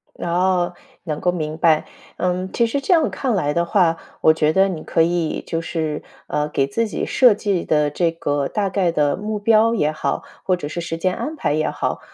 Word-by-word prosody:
哦， 180 +1 0 0.3
能 155 -4 -3
够 180 - +2
明 155 -3 -4
白。 160 -2 +3 0.3
嗯， 180 +1 -1
其 235 - +2
实 255 +5 -1
这 320 - +2
样 325 -2 +3
看 255 -5 -1
来 145 -6 0
的 170 - +1
话， 170 -3 +2 0.2
我 160 - +6
觉 155 -1 +2
得 190 +4 +4
你 170 -5 -5
可 165 - +1
以 170 -1 0
就 165 -1 -2
是， 160 -2 -3 0.3
呃， 150 0 -1
给 135 -2 0
自 225 +12 -1
己 - - -3
设 250 -4 +5
计 200 -3 -1
的 150 -1 +2
这 165 +3 0
个 145 -4 -1
大 205 -2 -1
概 190 -3 +1
的 150 -3 +1
目 210 0 -4
标 225 +2 +4
也 150 -7 +1
好、 155 - -2 0.2
或 185 - +2
者 175 -5 -6
是 170 +3 -4
时 165 -1 -4
间 185 +2 0
安 310 - -4
排 300 - -1
也 155 +1 0
好， - - -2
175 Hz, 230 characters per minute, -21 LUFS, 155-200 Hz, 0.3 s, 我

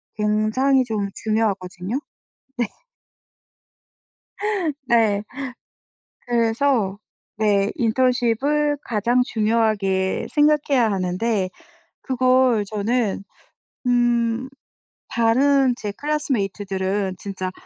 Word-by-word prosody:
굉장히 215 +6 +2
좀 215 -4 -2
중요하거든요. 205 0 -1 0.6
네. 240 - +1 2.2
네. 220 -4 +3 1.0
그래서 230 -3 +1 0.4
네 205 -2 +2
인턴십을 260 +4 +1
가장 235 +3 +1
중요하게 215 -5 0
생각해야 295 -5 +3
하는데 190 +2 0 0.5
그걸 255 -3 +3
저는 215 +1 -1 0.7
음 240 0 +2 0.6
다른 260 +3 +3
제 210 - -4
classmate들은 200 -9 -1
진짜 185 -1 -5
225 Hz, 185 characters per minute, -22 LUFS, 200-255 Hz, 2.2 s, 네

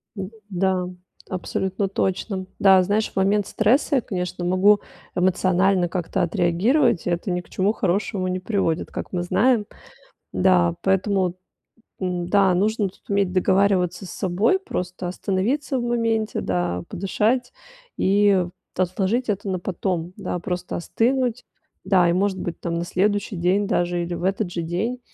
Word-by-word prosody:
Д 190 -2 -5 0.2
да, 185 -1 0 0.4
абсолютно 190 +1 -2
точно. 190 0 -2
Да, 190 -2 +6
знаешь, 205 +3 0
в - - -29
момент 200 +1 +2
стресса 255 +7 +2
я, - - +2
конечно, 180 -4 -4
могу 190 +4 +4 0.4
эмоционально 185 0 +2
как-то 180 +1 -2
отреагировать. 175 - +2
Это 175 +2 -1
ни 180 0 -1
к - - -22
чему 195 +2 +1
хорошему 195 -1 -1
не 185 0 -1
приводит, 185 -4 -1
как - - -6
мы 175 -1 -1
знаем. 225 +4 +2 0.7
Да, 180 -2 +3
поэтому 190 -1 +1 0.7
н-да, 185 +1 +2
нужно 210 +2 +1
тут 185 - -22
уметь 200 -2 +1
договариваться 185 -1 +2
с - - -8
собой, 200 - +1
просто 180 - -4
остановиться 225 +10 -1
в - - -3
моменте, 230 -2 0
да, 90 -1 -1
подышать 215 +7 0 0.4
и 200 -1 +3 0.3
отложить 190 +7 0
это 200 -1 -1
на 185 - -1
потом, 180 -1 -3
да, - - -3
просто 180 0 -4
остынуть, 245 +6 0 0.4
да, 180 -3 +4
и, - - +2
может 190 +1 0
быть, 175 - -5
там, 170 -1 -3
на 170 +1 -2
следующий 205 +3 0
день 185 +4 +1
даже 175 -1 0
или 175 +1 -4
в 175 - -5
этот 190 0 0
же 170 - -3
день 190 +10 -2
190 Hz, 150 wpm, -23 LUFS, 180-205 Hz, 0.7 s, Да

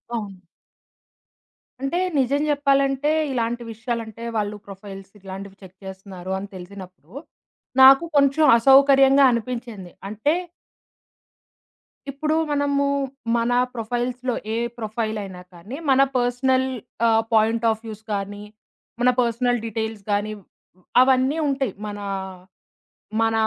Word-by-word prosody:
అవును. 200 -4 -5 1.4
అంటే 275 +6 -1 0.2
నిజం 275 +3 +1
చెప్పాలంటే, 275 0 +2 0.2
ఇలాంటి 235 -1 -2
విషయాలంటే 225 0 -5
వాళ్ళు 210 0 -2
ప్రొఫైల్స్ 195 0 -10
ఇలాంటివి 195 +1 -9
చెక్ 190 0 -14
చేస్తున్నారు 190 -1 -8
అని 200 +1 -6
తెలిసినప్పుడు. 185 0 -11 0.7
నాకు 270 +3 +9
కొంచెం 285 +2 +4
అసౌకర్యంగా 270 +2 +6
అనిపించింది. 235 -6 -5 0.2
అంటే 220 +9 0 1.8
ఇప్పుడు 305 +3 -1 0.2
మనము 285 -1 +1 0.5
మన 235 +1 0 0.2
ప్రొఫైల్స్‌లొ 245 +2 -2 0.2
ఏ - - -1 0.2
ప్రొఫైలయినా 215 -4 -4
కానీ, 200 +11 -9
మన 270 0 +5 0.2
పర్సనల్ 260 +2 +1 0.4
ఆహ్, 225 0 +3
పాయింట్ 225 +1 +3
ఆఫ్ 220 0 -1
వ్యూస్ 220 -1 -8
గాని, 205 +1 -4 0.6
మన 250 - +5
పర్సనల్ 245 0 0
డీటెయిల్స్ 220 -1 -4
గాని 205 +1 0 0.7
అవన్నీ 260 +3 +3
ఉంటాయి 270 -6 -1
మన 205 0 -6 1.2
మన 225 0 +2
230 Hz, 100 wpm, -23 LUFS, 205-265 Hz, 1.8 s, నాకు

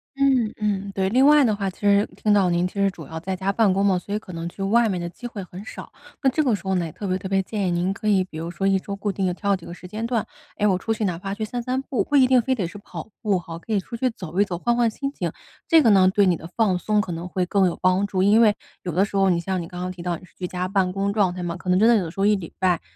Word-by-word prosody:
嗯 265 -5 +2
嗯， 200 -2 -1
对。 190 -1 +1
另 255 +6 +4
外 300 -1 +7
的 215 -3 +2
话， 200 -1 -2
其 185 - -14
实 205 0 +4
听 210 - +1
到 195 -3 +4
您 175 +1 +1
其 - - -12
实 200 - +4
主 170 -5 -10
要 160 +2 -6
在 185 +3 -3
家 190 +1 -1
办 210 -1 +3
公 195 +2 +1
嘛， 185 -2 +3
所 200 - -7
以 - - +1
可 190 -4 -9
能 165 +1 -4
去 195 - -7
外 225 +3 +3
面 185 -3 -1
的 175 - -4
机 240 +8 -8
会 210 -5 -7
很 180 +2 -10
少。 - - -9 0.3
那 270 - +5
这 310 +4 +1
个 250 -6 +2
时 190 - -10
候 190 0 -1
呢， 175 -2 0
也 160 - -6
特 205 - -8
别 185 -1 0
特 190 - -6
别 195 0 +2
建 200 0 -2
议 - - 0
您 175 +2 0
可 215 +2 -6
以， 195 -3 +4
比 160 -4 -10
如 165 +1 -4
说 195 +2 -3
一 195 0 +3
周 200 +1 -6
固 200 0 -2
定 190 -1 -1
地 180 - 0
挑 200 +2 0
几 180 - -10
个 170 - -8
时 180 - -11
间 215 +4 -4
段， 235 -3 0 0.3
哎， 210 - 0
我 190 - +3
出 225 - -4
去， 220 -1 0
哪 175 -3 -2
怕 195 +1 -4
去 220 - -3
散 240 +3 -4
散 255 +2 -1
步， 270 - -1
不 290 - -2
一 270 -2 +7
定 255 -1 +4
非 260 +3 0
得 195 -8 -2
是 205 +4 -10
跑 175 -2 -9
步 205 -4 +1
吼， 165 -1 -7
可 225 - -10
以 210 - +3
出 195 - -8
去 255 +2 +1
走 180 -6 -6
一 - - +4
走， 180 -3 -4
换 240 +7 +1
换 240 -1 +3
心 275 +5 -4
情， - - -3 0.4
这 325 -2 +6
个 230 - +5
呢， 190 -2 +6
对 200 0 +3
你 180 -2 +3
的 165 - -9
放 210 -6 +2
松 210 +3 +1
可 185 -4 -2
能 170 +2 -5
会 180 0 -1
更 190 +1 +2
有 175 - -2
帮 185 +2 +2
助。 190 -2 0
因 210 +3 +5
为 215 -3 +5 0.3
有 180 - -3
的 185 +5 +2
时 200 - -9
候 195 -1 +4
你 175 -2 +2
像 185 +1 -2
你 165 - -7
刚 180 +1 -8
刚 180 0 -3
提 180 -1 -9
到 175 -1 -2
你 180 - -15
是 - - -25
居 180 - -4
家 180 0 -3
办 190 -1 +1
公 195 +1 -1
状 200 -4 +2
态 180 0 -5
嘛， 170 -1 -3
可 185 - -7
能 180 - +4
真 220 +4 +5
的 235 - +6
有 205 - +2
的 - - -5
时 - - -11
候 195 - +3
一 210 0 +4
礼 175 -4 -7
拜 180 -3 +2
195 Hz, 370 characters per minute, -23 LUFS, 180-215 Hz, 0.4 s, 外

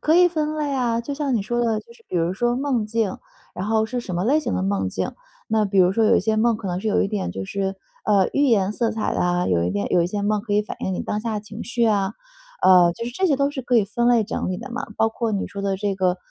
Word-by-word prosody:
可 310 - +3
以 355 +1 +7
分 310 -2 -2
类 295 -2 -1
啊。 240 -3 0
就 280 +5 -5
像 280 -3 -1
你 210 - +1
说 240 +3 -1
的， 225 -2 +1
就 235 - -17
是 235 - -21
比 180 - -2
如 170 +2 +1
说 240 +4 0
梦 260 -6 0
境， 220 -3 -1 0.4
然 185 +3 -4
后 220 0 +2
是 245 +3 -3
什 190 -6 -6
么 175 +3 -1
类 295 +6 +3
型 - - -2
的 90 - -1
梦 95 -1 0
境。 - - -3 0.4
那 220 -1 +2
比 195 -1 0
如 180 0 +5
说 225 +2 +2
有 - - +5
一 - - +3
些 220 +2 0
梦 230 0 +3
可 215 - -7
能 180 0 -2
是 220 - -2
有 210 - +2
一 195 - 0
点 200 - -2
就 95 +1 -5
是， 195 - -3 0.3
呃， 200 -3 +4
寓 285 0 +3
言 205 -4 +2
色 230 +1 0
彩 220 -1 -2
的 - - -1
啊， 180 0 +1
有 85 -2 +2
一 90 - 0
点 100 +1 -1
有 175 - +4
一 170 - +1
些 205 +2 -3
梦 210 0 +1
可 205 -1 -3
以 210 - +3
反 - - -7
映 190 - -2
你 - - -3
当 210 - -2
下 225 -1 -3
的 210 - -2
情 210 +1 -9
绪 235 -1 0
啊。 205 -1 +1 0.5
呃， 180 -2 +6
就 230 - -5
是 240 - -4
这 375 +10 0
些 285 -6 +2
都 280 +1 +1
是 285 -2 -5
可 245 0 +1
以 215 - +4
分 235 +4 -1
类 235 -3 +4
整 200 - -3
理 185 - -2
的 245 +5 -8
嘛。 235 - -4
包 225 - +3
括 225 0 -2
你 200 - -1
说 200 - -7
的 195 -1 -1
这 200 0 -1
个， 185 -1 +1
215 Hz, 330 characters per minute, -22 LUFS, 190-240 Hz, 0.5 s, 以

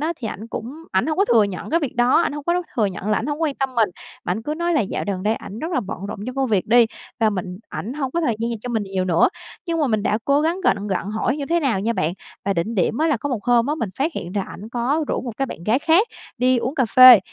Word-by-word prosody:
á 320 +3 0
thì 230 -8 -5
ảnh 215 - -7
cũng 245 +7 -6 0.2
ảnh 190 +8 +2
hông 315 +2 -1
có 395 - +5
thừa 230 - +5
nhận 200 +4 -5
cái 335 - +2
việc 285 -7 -4
đó, 245 +6 +4
ảnh - - -1
hông 295 -1 -6
có 345 - +2
đấu 360 +1 +1
thừa 215 - +3
nhận 190 +1 -5
là 210 - +3
ảnh 225 - -4
hổng 300 +2 -2
quan 295 -3 +1
tâm 270 -1 -2
mình. 225 -3 +3 0.4
Ảnh 185 +5 -2
cứ 300 +5 -3
nói 340 +1 0
là 300 - +3
dạo 195 - -2
đần 190 -2 -3
đây 215 +2 +2
ảnh 210 - -8
rất 325 +8 -4
là 255 - +1
bận 195 -4 -6
rộn - - -5
trong 255 - -5
công 270 -1 +1
việc 200 -4 +1
đi, 235 +1 +6 0.3
và 220 - +4
mình 185 -2 -4
ảnh 235 - -5
hông 275 -3 -2
có 340 - -1
thời 240 -9 0
gian 230 +1 -1
dành 230 - -3
cho 250 - -5
mình 225 -3 0
nhiều 190 -1 -2
nữa. 170 -2 +4 0.4
Nhưng 335 -1 -1
mà 300 - +3
mình 215 -4 0
đã 210 +2 +1
cố 280 +1 +3
gắng 335 +4 0
gạnh 205 - +2
gặng 195 +1 -2
hỏi 220 +5 0
như 285 -2 -4
thế 340 +2 +1
nào 245 -10 +1
nha 225 +4 0
bạn. 160 -5 0 0.3
Và 200 - +1
đỉnh 195 +6 -2
điểm 210 - +1
á 320 - +2
là 300 - +2
có 285 - -4
một 245 -6 -3
hôm 240 -1 +3
á 295 - 0
mình 220 -8 -2
phát 310 +5 +1
hiện 175 +2 -5
là 200 - +1
ảnh 210 +4 -9
có 255 +6 0
rủ - - 0
một 240 -4 -6
cái 270 - 0
bạn 170 - -8
gái 220 +6 +3
khác 335 +9 +4 0.3
đi 250 +1 +3
uống 255 +4 -2
cà 265 -4 +2
phê, 255 -1 +10
240 Hz, 315 wpm, -22 LUFS, 210-290 Hz, 0.4 s, phê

